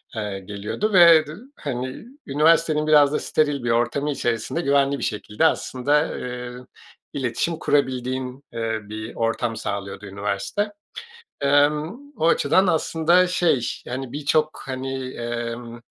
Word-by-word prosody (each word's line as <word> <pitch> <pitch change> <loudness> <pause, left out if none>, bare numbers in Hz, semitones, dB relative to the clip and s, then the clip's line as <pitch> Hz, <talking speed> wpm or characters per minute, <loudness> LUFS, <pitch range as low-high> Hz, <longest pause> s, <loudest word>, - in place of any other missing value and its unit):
eee, 105 -3 -3
geliyordu 105 - -3
ve 170 -4 +7
dı 155 +5 -9 0.2
hani, 130 - -5 0.2
üniversitenin 155 +1 +3
biraz 145 -2 +5
da - - +1
steril 145 -4 0
bir 120 - -1
ortamı 140 +5 +1
içerisinde 120 +5 -2
güvenli 140 -1 +2
bir - - -5
şekilde 105 +6 -1
aslında, 145 0 +1
eee, 125 0 -5 0.6
iletişim 140 +5 -1
kurabildiğin, 130 -1 -1
eee, 115 -1 -2
bir 110 +2 -7
ortam 115 0 -1
sağlıyordu 100 0 -5
üniversite. 100 - -3 0.7
Emm, 150 - +2 0.2
o 160 - +2
açıdan 170 +4 +3
aslında 170 +1 +3
şey, 175 -7 +2 0.3
hani, 130 0 -5
birçok, 150 +1 0
hani, 130 0 -4
emm, 120 0 -5
135 Hz, 125 wpm, -23 LUFS, 120-155 Hz, 0.7 s, ve